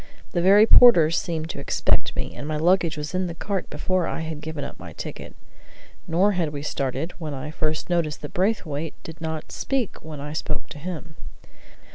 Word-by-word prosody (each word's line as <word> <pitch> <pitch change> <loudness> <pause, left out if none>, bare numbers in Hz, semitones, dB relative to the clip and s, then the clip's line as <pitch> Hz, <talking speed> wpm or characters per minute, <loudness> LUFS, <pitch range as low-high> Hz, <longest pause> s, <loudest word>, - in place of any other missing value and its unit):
The 175 - +1
very 200 +4 +7
porters 170 -10 +7
seemed 165 -2 -2
to - - -7
expect 140 - +1
me, - - -3
and 145 - -6
my 155 0 -1
luggage 170 0 +3
was 150 +3 -4
in 185 0 0
the 170 - -5
cart 195 +1 -3
before 185 -2 0
I - - -3
had 160 -2 -5
given 155 -2 -5
up - - -7
my - - -9
ticket. - - -7 0.7
Nor 185 +5 +3
had 175 -5 0
we 145 -1 -6
started 140 +3 -2
when 155 -4 -4
I 135 +3 -5
first 155 0 -1
noticed 165 -5 0
that 145 - -6
Braithwaite 165 -6 -1
did 160 -1 -10
not 160 -1 -4
speak 265 -6 -2
when 155 -2 -7
I 145 +1 -5
spoke 155 0 -3
to 150 - -8
him. 165 -1 -6
160 Hz, 195 wpm, -24 LUFS, 150-180 Hz, 0.7 s, very